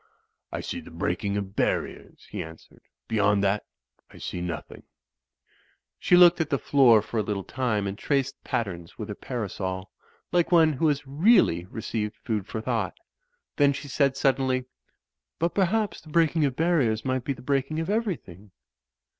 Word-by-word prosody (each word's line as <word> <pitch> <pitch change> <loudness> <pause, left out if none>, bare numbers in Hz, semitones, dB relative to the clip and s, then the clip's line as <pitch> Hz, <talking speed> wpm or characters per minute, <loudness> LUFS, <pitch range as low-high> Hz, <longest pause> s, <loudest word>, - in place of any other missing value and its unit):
"I - - -3
see - - -4
the - - -12
breaking 90 +5 -2
of 100 - 0
the 95 - -15
barriers,'* - - -2
he - - -3
answered, 80 0 -14 0.3
'^beyond 105 -2 +2
that 100 +1 +1 0.4
I - - -15
see 90 - -5
nothing/' 85 -4 -6 1.2
She 180 - +4
looked 175 -1 +7
at 155 - -1
the 140 - +2
floor 125 -7 +5
for 115 - -3
a - - +3
little 100 -1 -3
time 120 -3 -1
and 100 0 -3
traced 140 +4 -1
patterns 90 -7 -3
with 110 -1 -6
her - - -3
parasol, 95 -5 -4 0.4
like 175 0 +2
one 160 -3 +5
who 150 +4 +1
has 145 -1 0
really 140 - +4
re 110 +4 -8
ceived 105 -2 -2
food 110 -5 -3
for 110 - -4
thought. 115 -1 -2 0.6
Then 145 -1 +4
she 145 +1 -7
said, 140 -1 +1
suddenly, 130 -2 +1 0.7
"But 170 +1 0
perhaps 205 +1 +1
the 155 - -15
breaking 160 -1 +3
of 135 -3 -1
barriers 145 -10 +1
might 130 -1 0
be 140 - -1
the 125 -1 -14
breaking 140 +3 0
of 165 - -2
everything." 180 - -3
130 Hz, 170 wpm, -26 LUFS, 105-155 Hz, 1.2 s, looked